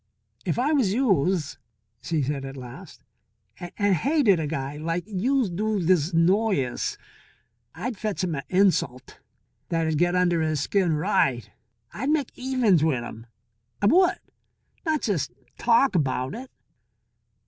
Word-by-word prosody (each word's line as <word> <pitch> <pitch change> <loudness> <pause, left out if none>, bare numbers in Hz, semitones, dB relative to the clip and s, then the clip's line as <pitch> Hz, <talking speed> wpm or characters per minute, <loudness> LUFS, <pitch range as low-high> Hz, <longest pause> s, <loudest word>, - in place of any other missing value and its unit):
"If 170 - -1
I 265 +5 +1
was 225 -9 +2
youse," 185 - +1 0.4
she 160 -4 -1
said 140 0 -2
at 135 0 -7
last, 125 -2 -11 0.6
"and 200 +3 -1
hated 230 - +3
a 155 - -2
guy 140 -1 -4
like 165 +3 -2
youse 220 +3 0
do 210 +3 -1
this 175 -2 +2
Noyes, 170 - +1 0.8
I'd 240 -1 -4
fetch 210 -3 -2
'im 175 -3 -1
a 140 - -3
insult 180 -10 +1 0.5
that'd 160 -2 0
get 175 +1 +2
under 175 -2 +2
his 155 -2 0
skin 180 +3 +1
right. 130 -5 0 0.4
I'd 270 +7 -3
make 300 -4 +1
evens 250 - +2
wit' 135 -7 +1
'im, 115 -1 -9 0.5
I - - 0
would, 355 - +4 0.7
not 310 -5 0
jes' 165 -10 0 0.3
talk 240 +2 +3
about 135 -5 0
it." 260 +2 -8
180 Hz, 135 wpm, -25 LUFS, 150-220 Hz, 0.8 s, would